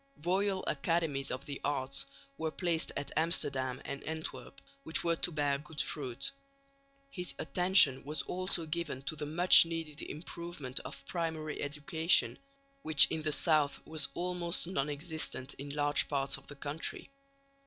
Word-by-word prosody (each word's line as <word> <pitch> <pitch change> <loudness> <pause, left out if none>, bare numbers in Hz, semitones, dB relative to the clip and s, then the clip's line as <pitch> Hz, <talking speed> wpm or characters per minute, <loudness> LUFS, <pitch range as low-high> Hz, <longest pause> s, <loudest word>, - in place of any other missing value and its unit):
Royal 190 +1 +1
Academies 145 -1 0
of 125 - -5
the 140 -2 -6
Arts 140 - 0 0.3
were 160 - -2
placed 165 0 0
at 145 - -4
Amsterdam 135 -5 +1
and 140 - -5
Antwerp, 160 - -6 0.2
which 160 - +1
were 170 0 +1
to 175 - +1
bear 145 -3 0
good 150 0 -10
fruit. 135 - -2 0.8
His 180 -7 -3
attention 180 -7 +4
was 150 +1 -2
also 185 -2 -1
given 155 -4 -4
to 155 - -3
the 150 -1 -4
much 175 +4 +8
needed 165 -3 -5
improvement 155 -4 -6
of - - -9
primary 160 -3 -3
education, 150 +4 +1 0.4
which 155 - +6
in 160 - -1
the 155 0 -1
south 150 -2 +3
was 160 -1 +1
almost 175 -1 -1
non 150 -5 -1
existent 150 -3 -3
in 140 +1 -6
large 145 0 +2
parts 135 -1 0
of - - -10
the 145 - -10
country. 145 - -4
155 Hz, 150 wpm, -32 LUFS, 145-170 Hz, 0.8 s, much